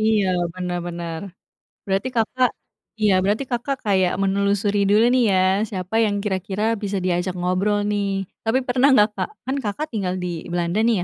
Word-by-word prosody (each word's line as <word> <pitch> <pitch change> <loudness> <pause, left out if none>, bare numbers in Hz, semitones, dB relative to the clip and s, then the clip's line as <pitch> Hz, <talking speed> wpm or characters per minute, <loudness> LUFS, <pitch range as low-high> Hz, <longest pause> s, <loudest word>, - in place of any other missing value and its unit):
iya, 215 -3 +2 0.3
bener 180 -1 -3
bener. 170 -2 -5 0.7
Berarti 195 +5 0
Kakak, 245 +2 +2 0.5
iya 210 -2 +4
berarti 210 +7 +1
Kakak, 255 +3 -1
kayak 190 -3 +2
menelusuri 200 +1 +1
dulu 215 +3 +5
nih 255 -1 +4
ya, 185 - +3 0.3
siapa 185 +2 -5
yang 205 -1 0
kira-kira 195 +1 -2 0.2
bisa 200 0 -1
diajak 180 0 0
ngobrol 185 +4 +1
nih. 195 -1 -1 0.2
Tapi, 230 +4 +2
pernah 250 +2 +3
enggak, 210 -3 +5
Kak, - - -2 0.2
kan 265 +2 -1
Kakak, 220 +10 -3
tinggal 185 -4 -1
di - - -2 0.2
Belanda 175 +3 0
nih 235 -2 +3
200 Hz, 165 wpm, -22 LUFS, 185-220 Hz, 0.7 s, dulu